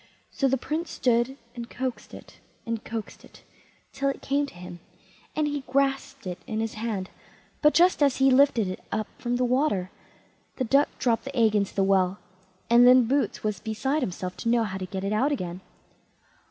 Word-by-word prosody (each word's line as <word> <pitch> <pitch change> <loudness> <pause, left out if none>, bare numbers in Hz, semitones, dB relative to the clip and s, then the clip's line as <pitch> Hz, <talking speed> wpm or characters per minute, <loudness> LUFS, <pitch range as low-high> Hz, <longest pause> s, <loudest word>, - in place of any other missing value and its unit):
So 275 - +1
the 270 +1 +2
Prince 315 +6 -3
stood 245 +2 +1 0.2
and 235 -1 -7
coaxed 250 -4 -5
it - - -14 0.3
and 230 -2 -3
coaxed 225 -2 -6
it, - - -17 0.5
till 275 - 0
it 275 - -5
came 285 +1 0
to - - -13
him, 175 0 -9 0.6
and 305 -1 +1
he 290 -1 -2
grasped 275 -2 0
it 180 -1 -5
in 220 - -2
his 225 0 -2
hand; 215 -4 -4 0.5
but 300 -1 +4
just 350 0 +4
as 280 -3 +3
he 270 0 +4
lifted 255 -5 +4
it 185 - -6
up 215 0 -1
from 240 0 -1
the 250 0 +1
water 245 -8 +1 0.6
the 260 - -1
duck 275 +4 +3
dropped 235 -1 0
the 275 0 -6
egg 220 -2 +4
into 200 -2 0
the 195 - +2
well, 190 -1 +2 0.5
and 240 +1 +6
then 255 0 +7
Boots 275 +4 0
was 210 -3 -1
beside 265 +7 -1
himself 185 -5 -4
to 230 - -2
know 235 -1 +3
how 190 -3 -4
to 185 - -5
get 190 +1 -5
it 200 +2 -1
out 265 +7 +2
again. 180 -9 -4
240 Hz, 195 wpm, -26 LUFS, 205-275 Hz, 0.6 s, then